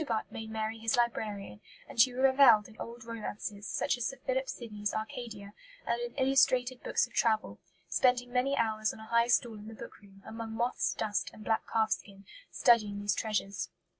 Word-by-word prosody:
Butt 220 -2 -2
made 220 -1 -6
Mary 220 0 -3
his 225 0 +1
librarian; 210 - -1 0.3
and 260 -5 +2
she 255 +1 +5
revelled 260 -4 +6
in 220 - -16
old 235 0 -7
romances, 210 -2 -5
such - - 0
as 245 - 0
Sir 270 - -5
Philip 260 0 0
Sydney's 210 -5 -4
Arcadia, 215 -2 -6 0.3
and 235 0 0
in 240 0 -5
illustrated 260 -2 +3
books - - +1
of 245 - -19
travel; 220 -2 +1 0.3
spending 245 -1 +2
many 270 +3 +1
hours 215 -1 +1
on - - -12
a 220 - -9
high 235 +1 +3
stool 235 -2 +2
in 210 - -11
the 225 - -9
bookroom, 195 -2 -13
among 225 0 -6
"moths, 235 +3 0
dust, 210 -1 -1
and 215 - -12
black 220 -1 +1
calf 220 -1 +2
skin," 195 -1 -4 0.2
studying 210 -4 +3
these 205 -1 +1
treasures. 205 -2 -2
225 Hz, 185 wpm, -31 LUFS, 215-245 Hz, 0.3 s, revelled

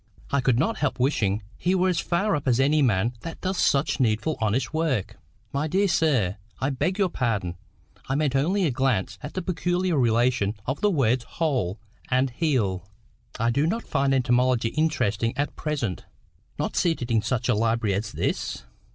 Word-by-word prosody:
I 140 - +2
could 125 -2 +2
not 225 - +1
help 140 -4 -1
wishing 110 -6 +1
he 180 +2 0
were 185 0 +2
as 180 -2 +1
far 190 +3 +1
up 145 -1 -4
as 125 -1 +3
any 145 +3 +3
man 115 -2 +2
that 165 +4 -7
does 185 0 -2
such 145 +2 +2
needful 115 +5 +1
honest 110 +4 0
work. 155 - -1 0.4
"My 140 +3 0
dear 195 +5 +2
sir, 130 - +2 0.2
I 135 +2 0
beg 180 +8 -1
your 200 -2 +3
pardon. 105 - -1 0.5
I 135 - +1
meant 145 -2 +1
only 180 +8 +2
a 150 - +1
glance 120 -7 0
at 145 - -8
the 185 - -2
peculiar 175 -2 0
relation 120 -3 +2
of 135 +3 -3
the 210 - +4
words 130 - +2
WHOLE 125 - -1 0.3
and 130 +1 +2
HEAL." 110 - 0 0.5
"I 115 +1 +2
do 140 +6 +1
not 225 +7 -1
find 135 0 0
etymology 125 -2 +2
interesting 120 -8 0
at 145 +1 -1
present." 140 - -3 0.5
"Not - - -2
seated 155 -9 0
in 110 -1 +3
such 120 +4 -1
a - - +3
library 110 -1 +1
as 100 +2 -2
this?" - - -2
130 Hz, 180 wpm, -25 LUFS, 115-155 Hz, 0.5 s, the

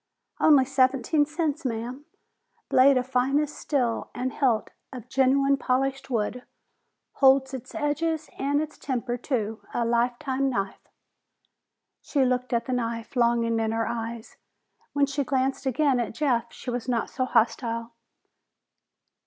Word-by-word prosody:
"Only 290 -4 +6
seventeen 270 +3 +2
cents, 310 -1 -2
ma'am. 250 +3 -4 0.6
Blade 265 +1 +6
of 250 - 0
finest 270 +4 +1
steel 245 -6 -1
and 255 0 -2
hilt 245 -6 +1 0.2
of 250 -3 -9
genuine 275 +1 +3
polished 270 +1 -1
wood! 240 +1 -1 0.8
Holds 270 -1 +4
its 260 +2 -8
edges 315 +1 -1
and 285 +1 +1
its 310 0 -5
temper, 245 -3 -2
too! 225 -4 -3
A 235 - +1
lifetime 245 +3 0
knife!" 195 -6 -3 1.1
She 275 -3 +1
looked 250 0 0
at 235 -1 0
the 255 - -2
knife, 230 0 -3
longing 235 -1 +2
in 220 0 0
her 225 0 0
eyes. 230 0 -5 0.6
When 285 -1 +3
she 280 +1 -2
glanced 265 +1 -1
again 265 0 +2
at 230 -2 -3
Jeff, 240 -5 0
she 250 - -6
was 245 +1 -4
not 235 -3 0
so 255 - -1
hostile. 230 -1 0
255 Hz, 135 wpm, -26 LUFS, 235-275 Hz, 1.1 s, Only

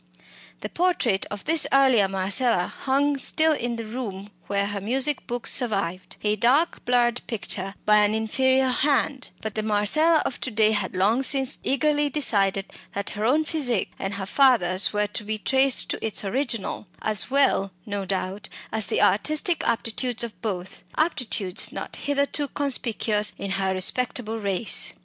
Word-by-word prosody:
The - - -5
portrait 325 - 0
of 205 -1 -7
this 320 0 +5
earlier 260 -7 +4
Marcella 195 +1 +1
hung 280 +1 0
still 315 +3 +3
in 240 -4 -2
the 230 -1 -6
room 210 -4 -6 0.2
where 200 0 0
her 200 0 -4
music 265 +7 0
books 245 0 0
survived, 195 -7 -1
a 210 0 +1
dark 260 - +2
blurred 245 -1 +2
picture 195 -3 -3
by 210 0 +5
an 210 0 +3
inferior 260 +4 +2
hand; 275 +1 +1
but 220 -1 -4
the 215 - -2
Marcella 220 +11 +2
of 250 - -4
to - - -2
day 215 -1 +3
had 205 -4 -2
long 210 +7 +2
since 270 0 -1
eagerly 295 +2 +1
decided 200 -9 +1 0.3
that 200 0 -3
her 210 +1 -3
own 295 +7 +3
physique 265 - -2
and 195 +1 -3
her 195 -1 -4
father's 195 -7 +3
were 210 0 0
to 210 +1 -4
be 215 +1 -3
traced 265 +4 +1
to - - -4
its 215 -1 0
original, 230 -3 -2 0.2
as 215 +1 +1
well, 270 -7 +2 0.2
no 205 -1 -3
doubt, 190 +1 -3 0.2
as 220 -2 -1
the - - +1
artistic 310 - +1
aptitudes 235 +1 -1
of 235 -2 -7
both 190 -4 -5
aptitudes 230 - 0
not - - -6
hitherto 285 0 0
conspicuous 230 -7 0
in 200 - -5
her 195 0 0
respectable 225 +4 0
race. 200 +1 0
225 Hz, 160 wpm, -24 LUFS, 200-270 Hz, 0.3 s, this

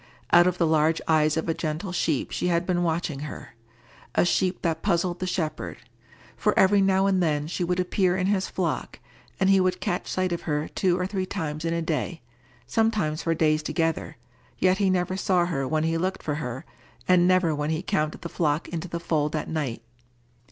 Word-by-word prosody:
Out 175 +1 +7
of 180 0 0
the 170 - +2
large 160 0 +3
eyes 155 -1 +3
of 160 - -2
a 165 - +1
gentle 160 +4 -3
sheep 160 -5 -1
she - - -1
had 170 0 +1
been 175 -1 0
watching 165 -3 -1
her—a 120 -2 -5
sheep 185 +1 0
that 165 -2 0
puzzled 175 -2 0
the 185 - -2
shepherd; 165 -4 -3 0.6
for 210 - 0
every 195 +1 +5
now 190 0 +3
and 190 -2 +2
then 150 -3 +1
she 175 +3 -3
would 180 +1 0
appear 180 0 +1
in 185 - 0
his 195 -1 +1
flock, 175 -5 -2 0.4
and 190 0 +4
he 195 - +5
would 185 0 +1
catch 175 - -2
sight 185 -1 0
of 170 - -2
her 150 0 0
two 180 -2 +1
or 180 - -1
three 190 -1 -2
times 155 -5 -4
in 165 - 0
a 170 - -1
day, 165 +1 -3 0.4
sometimes 190 - 0
for 165 0 0
days 155 -1 +2
together, 160 +1 -2 0.4
yet 185 +1 +2
he 195 -2 +3
never 185 0 0
saw 185 -2 +2
her 135 -6 -2
when 155 +2 0
he 165 0 0
looked 190 +2 -2
for 150 - -1
her, 125 +2 -5 0.4
and 180 -1 +5
never 185 -3 +3
when 150 0 -2
he 160 +2 -1
counted 155 -6 -1
the 170 - -4
flock 155 -2 -1
into 170 +1 -4
the 170 0 -4
fold 155 -2 0
at 155 - -2
night. 135 -8 -3
170 Hz, 205 wpm, -25 LUFS, 155-185 Hz, 0.6 s, Out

